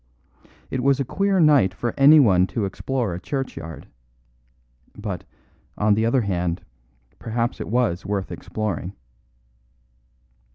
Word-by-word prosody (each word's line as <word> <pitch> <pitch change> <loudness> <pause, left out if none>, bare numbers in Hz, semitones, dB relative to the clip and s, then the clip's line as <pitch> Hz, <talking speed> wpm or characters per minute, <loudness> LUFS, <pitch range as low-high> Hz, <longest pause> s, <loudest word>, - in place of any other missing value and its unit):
It 130 - -1
was 140 +1 +3
a 140 - 0
queer 195 +7 +1
night 145 - +4
for 120 - -3
anyone 135 -11 +6
to 110 -1 -2
explore 115 +1 -2
a 85 - -5
churchyard. 90 - -5 1.1
But, 105 -5 -5 0.5
on 105 0 +3
the 110 +2 +1
other 125 +2 +2
hand, 90 -4 -2 0.6
perhaps 115 +1 -2
it - - -5
was 110 -6 0
worth 100 -1 -3
exploring. 100 -4 -4
110 Hz, 120 wpm, -23 LUFS, 95-135 Hz, 1.1 s, anyone